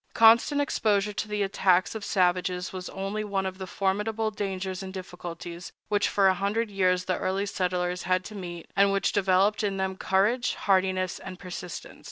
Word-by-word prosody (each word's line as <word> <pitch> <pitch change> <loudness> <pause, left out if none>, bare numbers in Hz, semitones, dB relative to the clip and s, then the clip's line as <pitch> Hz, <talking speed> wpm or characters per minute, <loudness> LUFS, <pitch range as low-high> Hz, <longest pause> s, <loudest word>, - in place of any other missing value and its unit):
Constant 230 +6 +6
exposure 210 -7 +1
to 215 - -3
the 210 -1 -1
attacks 185 -2 +2
of 220 -2 -6
savages 180 -1 +1
was 185 -1 -5
only 195 +2 -3
one 195 -2 -1
of 190 0 -4
the 190 - -5
formidable 210 +4 -1
dangers 190 -2 -3
and 190 -1 -6
difficulties 175 -1 -7 0.2
which 205 -1 +2
for 195 -1 +4
a 190 - +5
hundred 205 +4 -1
years 185 -2 +2
the 185 - -1
early 195 +2 -1
settlers 180 -2 -1
had 185 0 +1
to 215 - -8
meet, 175 -4 -7
and 200 0 +5
which 195 0 +1
developed 195 +2 +3
in 200 -2 -1
them 190 0 -1
courage, 205 +7 +1
hardiness, 185 -2 +1
and 185 -1 -8
persistence. 180 -2 -8
190 Hz, 180 wpm, -27 LUFS, 185-205 Hz, 0.2 s, Constant